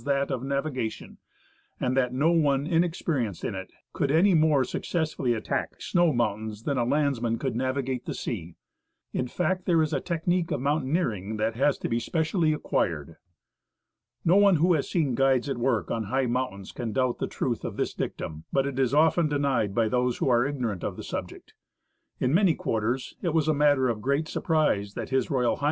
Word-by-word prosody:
that 140 0 0
of 125 - -2
navigation, 135 -4 -3 0.6
and 125 0 0
that 125 -2 +2
no 140 +6 +2
one 145 -4 +2
inexperienced 160 - 0
in - - -2
it 95 0 -7 0.2
could 140 - 0
any 175 +7 +4
more 155 -4 +4
successfully 150 -3 -1
attack 110 - -3
snow 175 -2 +2
moun 110 -4 -1
tains 105 +1 -10
than 140 - 0
a 125 - +1
landsman 125 -3 +1
could 130 -3 -3
navigate 130 0 -2
the - - -3
sea.^ 85 -7 -5 0.6
In 125 - -1
fact, 180 +6 -1
there 170 -3 +4
is 155 0 +1
a - - 0
technique 175 0 -1
of - - -1
mountaineering 130 - -1
that 110 +1 -1
has 140 +3 +2
to - - -3
be 115 - 0
specially 160 - 0
acquired. 80 - -1 1.1
No 175 +3 +5
one 200 -2 +6
who 175 +3 +3
has 150 -4 -1
seen 150 -8 +1
fruides 135 0 +2
at 135 -3 -2
work 120 -8 0
on 115 -1 -1
his^h 130 +5 0
mountains 105 -7 -3
can 115 -3 -4
doubt 130 -2 0
the - - -1
truth - - -2
of - - -5
this - - -1
dictum; 80 0 -5
but 135 0 +2
it 140 -1 -3
is 130 0 +2
often 160 +1 +4
denied 135 -8 0
by 115 -2 +3
those 125 +1 0
who - - 0
are 120 +1 +3
ignorant 120 -10 -3
of - - -3
the - - -7
subject. - - -7 0.7
In 130 +2 +1
many 180 -2 +4
quarters 115 +4 -2
it 170 -3 -1
was 155 -2 +2
a 155 - +4
matter 145 -3 +3
of 115 -3 -2
great 140 +6 0
surprise 130 - 0
that - - -5
H.R. 130 -1 +1
H. - - -6
135 Hz, 195 wpm, -27 LUFS, 120-155 Hz, 1.1 s, one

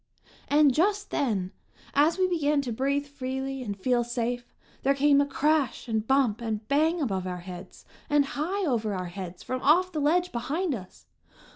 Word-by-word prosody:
And 290 -2 +5
just 405 +7 +1
then, 200 -9 0 0.4
as 300 +5 +3
we 370 -1 +3
began 300 -5 +1
to 250 - -4
breathe 280 +5 0
freely 270 -1 -4
and 205 -5 -4
feel 240 +4 +1
safe, 240 0 -3 0.3
there 275 +1 +2
came 285 0 +4
a 285 - 0
crash 295 -1 0
and 220 -1 -1
bump 260 -5 +2
and 220 -2 -3
bang 315 +5 +2
above 195 - -1
our 180 -1 -4
heads, 180 0 -10 0.2
and 290 -1 +4
high 370 +7 -1
over 220 -8 0
our 180 -1 -4
heads 185 -2 -7
from 255 0 -3
off 355 +6 +4
the 310 -4 -2
ledge 350 +5 +2
behind 295 +8 -1
us! 185 - -9
270 Hz, 175 wpm, -27 LUFS, 225-300 Hz, 0.4 s, And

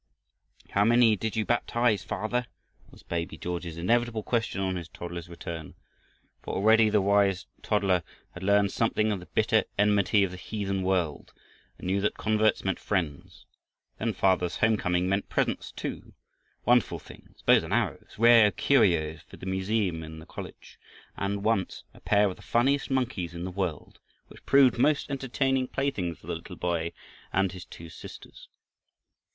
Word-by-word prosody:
"How 100 - +3
many 115 0 +5
did 110 +2 -3
you 110 -1 0
baptize, 120 -2 +1
father?" 120 +5 -2 0.4
was - - -17
baby 85 +2 -4
George's 85 -2 -5
inevitable 115 +5 +1
question 115 -4 -1
on 95 -1 -1
his 85 -2 -5
father's 85 -1 -7
return. 85 -2 -7 0.7
For - - -5
already 110 +2 +5
the 105 -2 +2
wise 100 -3 +2 0.2
toddler 95 -4 +1 0.3
had 90 - -10
learned 100 +1 +3
something 110 -1 +1
of 100 - -2
the 90 - -12
bitter - - +2
enmity 105 0 +3
of 95 - -1
the 90 - -8
heathen 100 -1 -3
world, 90 -5 -1 0.4
and - - -10
knew 95 +2 +1
that 105 - 0
converts 110 0 +2
meant 95 -2 -1
friends. 85 -8 -3 0.5
Then 110 0 -1
father's 90 -2 +1
home 110 0 +3
coming 90 -2 0
meant 100 +1 -1
presents - - -1
too, - - -6 0.5
wonderful 120 -1 +3
things, - - -16
bows - - +6
and - - -8
arrows, - - -1
rare 115 -1 +7
curios 85 - +2
for - - -15
the - - -10
museum 95 -2 -1
in 80 0 -9
the 80 - -11
college, - - -10 0.4
and, 100 0 -2
once, 110 -4 0
a - - -16
pair 105 0 +3
of 95 - -5
the - - -15
funniest 135 +5 +1
monkeys 120 -10 -1
in 85 - -5
the 90 - -4
world, 90 -5 -4 0.3
which - - -15
proved 135 -3 +5
most 145 +2 +2
entertaining 135 -1 0
playthings 105 - -2
for - - -18
the - - -3
little - - -9
boy 85 -1 -1 0.4
and 95 -1 +1
his 90 -2 -9
two 85 - -11
sisters. - - -12
100 Hz, 165 wpm, -28 LUFS, 90-110 Hz, 0.7 s, rare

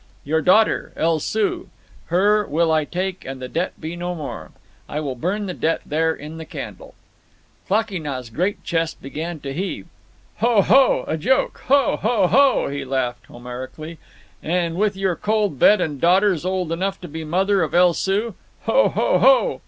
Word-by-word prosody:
"Your 160 +3 0
daughter, 210 +7 +3
El 165 -1 +1
Soo—her 210 - -1
will 160 +2 +1
I 155 -1 +2
take 185 +3 -4
and 135 0 -7
the 130 - -6
debt 170 +7 -3
be 160 +2 -5
no 175 +1 -4
more. 150 -4 -7 0.4
I 150 - -3
will 145 -4 -3
burn 185 - -2
the 185 - -4
debt 165 -1 -1
there 160 +2 +1
in 155 +1 -8
the - - -6
candle." - - -9 0.7
Klakee 205 -2 0
Nah's 130 -5 -5
great 180 - -2
chest 165 -1 -2
began 160 +4 -6
to 135 -1 -5
heave. 190 +7 -4 0.5
"Ho! 230 -4 +3
ho!—a 265 -11 +3
joke. 260 - 0
Ho! 275 -2 +3
ho! 225 -3 +1
ho!" 275 +8 +4
he 140 0 -4
laughed 125 -2 -3
Homerically. 130 +7 -8 0.4
"And 170 0 -1
with 200 +1 0
your 190 -2 0
cold 210 -8 -1
bed 210 - +6
and 150 -6 -3
daughters 180 -1 +3
old 185 -3 -1
enough 190 +3 -2
to 175 - -7
be 160 +1 -7
the 155 -1 -7
mother 190 +3 +2
of 160 -1 -1
El 175 0 +5
Soo! 200 +6 -1 0.3
Ho! - - +3
ho! - - +1
ho!" - - +4
175 Hz, 175 wpm, -21 LUFS, 155-200 Hz, 0.7 s, bed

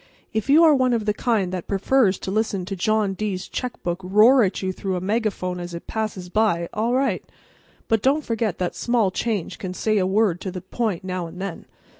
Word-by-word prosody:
If 220 +4 -2
you 310 +4 +7
are 315 -2 +7
one 255 -3 +3
of 225 -3 0
the 210 - +1
kind 210 -5 0
that 180 -2 -4
prefers 200 0 +2
to 190 - -4
listen 205 -3 -1
to 195 +1 -4
John 210 +1 +1
D's 190 -2 -3
checkbook 190 -8 -4
roar 215 +8 +6
at 195 -2 0
you 185 0 -1
through 190 0 -3
a - - -1
megaphone 190 -2 -1
as 175 -1 -6
it 170 - -8
passes 215 -5 -3
by, 175 -4 +1
all 230 +4 0
right. 270 +1 +1 0.6
But 225 -2 +2
don't 280 +5 +2
forget 225 -5 -1
that 180 -1 -2
small 235 -5 +1
change 200 -3 -2
can 185 -4 -5
say 215 +1 +1
a 185 - +1
word 195 -3 +2
to 190 - -4
the 185 0 -6
point 195 -1 -2
now 185 -2 -3
and 175 +2 -11
then. 195 -3 -6
205 Hz, 215 wpm, -23 LUFS, 185-225 Hz, 0.6 s, you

